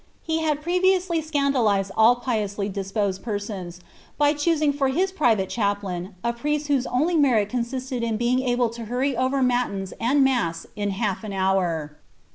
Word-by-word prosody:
He 320 0 -1
had 300 -2 -1
previously 360 0 +2
scandalized 265 -10 +1
all 225 +2 +6
piously 215 -5 -2
disposed 195 0 -2
persons, 200 -5 -5 0.4
by 290 0 +4
choosing 305 -1 +1
for 280 -1 +1
his 360 +9 +1
private 235 - +2
chaplain 200 -3 -2
a 235 - 0
priest 295 +4 -2
whose 275 -3 +1
only 310 +8 +1
merit 245 -9 +3
consisted 250 +1 -3
in 230 -2 -1
being 240 +2 +1
able 245 -2 +1
to 235 0 -7
hurry 255 +4 -1
over 260 +2 +1
matins 245 -6 0
and 270 +5 +3
mass 235 -12 0
in 205 -1 -2
half 200 0 -2
an 210 -2 -5
hour. 180 -6 0
240 Hz, 160 wpm, -24 LUFS, 200-280 Hz, 0.4 s, all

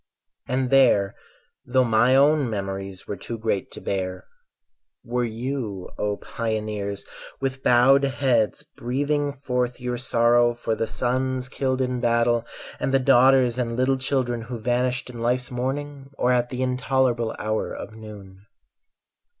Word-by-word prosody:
And 130 0 -1
there, 120 -8 +4 0.5
though 130 +1 +2
my 120 +2 +4
own 145 -1 +4
memories 95 -2 -5
Were 105 - -3
too 115 +5 -6
great 110 -3 -1
to - - -7
bear, 95 -1 -3 0.8
were 125 +1 -1
you, 115 -4 -4
O 105 -1 -1
pioneers, 105 -3 -4 0.3
With 135 -1 -3
bowed 130 +2 +5
heads 125 -6 +1
breathing 145 +4 -1
forth 125 -3 -2
your 125 -1 -3
sorrow 120 -1 +3
For 115 -1 -2
the 115 - -1
sons 130 +1 -1
killed 130 -1 -1
in 125 -1 -1
battle 120 -1 +2 0.3
and - - -1
the 135 - +5
daughters 130 -1 +4
And 115 -1 -2
little 130 +1 +2
children 130 -3 -1
who 120 +2 -6
vanished 125 +2 -1
in 120 - -9
life's 125 +2 0
morning, 135 +2 -4
Or 125 - +2
at 120 -1 +2
the 130 0 -2
intolerable 125 -2 0
hour 110 +1 -2
of 110 - -7
noon. 100 -3 -12
125 Hz, 140 wpm, -24 LUFS, 110-130 Hz, 0.8 s, bowed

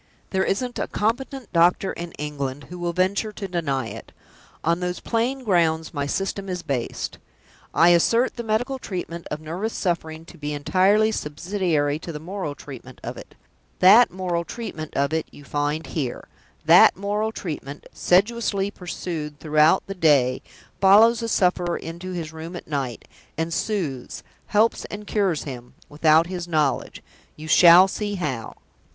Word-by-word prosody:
There 190 -1 +1
isn't 245 +5 -2
a - - -1
competent 245 +2 -2
doctor 175 +3 +3
in 170 0 -7
England 145 -2 -4
who 180 - -7
will 175 0 -1
venture 190 +5 0
to 200 -1 -5
deny 140 -8 -1
it! - - -10 0.5
On 170 +1 +1
those 180 -1 -3
plain 245 +4 -1
grounds 165 -6 +1
my 145 -2 -2
System 195 +4 -3
is 180 -1 -4
based. 130 -4 -3 0.5
I 170 - +5
assert 230 +9 +3
the 235 - -4
medical 245 +5 -1
treatment 175 -6 -6
of 150 - -4
nervous 175 +8 -4
suffering 165 -3 -3
to 170 - -14
be 150 0 -3
entirely 190 +9 +3
subsidiary 155 -3 -1
to 170 - -7
the 150 - -6
moral 170 -2 -5
treatment 130 -3 -11
of - - -5
it. - - -12 0.4
That 220 +6 +7
moral 180 -2 -2
treatment 155 -4 -7
of 140 +2 +1
it 160 - -1
you 145 - -14
find 145 +3 -2
here. 135 -2 -4 0.4
That - - +7
moral 205 +2 -1
treatment, 150 -8 -6
sedulously 200 +1 +1
pursued 165 -5 -6
throughout 155 +3 +3
the 195 - -5
day, 140 -8 +3 0.4
follows 215 +4 +6
the 230 - -3
sufferer 180 -3 +1
into 170 +3 -7
his 165 -3 -5
room 160 +2 -7
at - - -8
night; 135 -6 -4 0.3
and 165 +1 -2
soothes, 165 - -3 0.2
helps 215 +2 +2
and 210 0 -8
cures 195 -7 0
him, 125 -4 -9
without 155 +2 +4
his 175 -1 -5
own 170 - -10
knowledge 150 -3 0 0.3
you 155 +1 -9
shall 175 +3 +8
see 205 +1 -3
how." 135 - -4
175 Hz, 160 wpm, -23 LUFS, 150-200 Hz, 0.5 s, shall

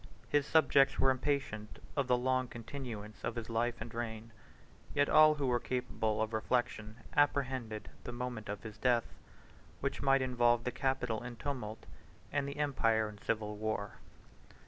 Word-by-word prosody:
His 145 -1 +2
subjects 140 -3 +5
were 135 - +4
impatient 130 -5 -2 0.2
of 140 -3 +1
the 125 -1 +4
long 130 +1 +1
continuance 115 -4 -7
of 115 - -2
his 115 -1 -5
life 120 +1 +1
and 110 0 -7
reign: 115 -1 -5 0.6
yet 145 0 +4
all 155 0 +7
who 145 -2 -1
were 125 -2 +2
capable 110 -4 -1
of 110 +1 -4
reflection 110 -1 -1 0.2
apprehended 130 -6 +1 0.2
the - - -5
moment 120 -3 -5
of 105 0 -4
his 110 -2 -8
death, 120 -3 +3 0.7
which 140 0 -2
might 135 -1 +4
involve 120 -2 +3
the 125 - -1
capital 125 -3 -1
in 120 0 -6
tumult, 115 -4 -5 0.5
and 145 -1 0
the 140 - -5
empire 115 -7 +2
in 105 -1 -12
civil 105 -1 -2
war. 105 -1 -3
120 Hz, 160 wpm, -34 LUFS, 110-135 Hz, 0.7 s, all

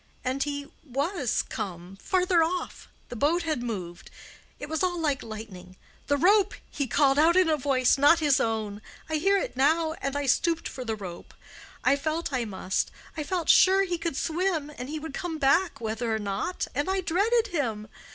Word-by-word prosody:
And 260 +2 -2
he 285 0 -2 0.2
was 280 - -1
come—farther 210 - -1
off—the 340 -6 -5
boat 315 +8 +1
had 310 -6 -1
moved. 185 -8 -6 0.5
It 290 - -7
was 315 0 -2
all 360 -2 0
like 295 -3 0
lightning. 205 -5 -9 0.3
'The 285 - +2
rope!' 400 +6 +4 0.2
he 280 -2 -2
called 275 +2 +3
out 330 +3 +5
in 370 -2 +5
a 315 - +3
voice—not 275 +2 +4
his 295 -4 +3
own—I 220 +7 -3
hear 390 +6 +3
it - - -3
now—and 310 0 +1
I 285 0 -1
stooped 330 +5 +1
for 255 - -7
the 225 -2 -2
rope—I 195 +7 -4
felt 310 +2 -2
I 250 -3 0
must—I 195 - -4
felt 340 +2 -2
sure 385 +1 +6
he 355 -3 -2
could 330 -4 -3
swim, 330 -3 -1
and 250 +2 -7
he 310 - -3
would 310 -1 -7
come 330 +1 -4
back 320 +6 +2
whether 225 +1 -2
or - - 0
not, 205 - -3
and 290 +6 -1
I 380 0 +1
dreaded 425 +7 +1
him. 230 - -2
290 Hz, 170 wpm, -27 LUFS, 240-340 Hz, 0.5 s, sure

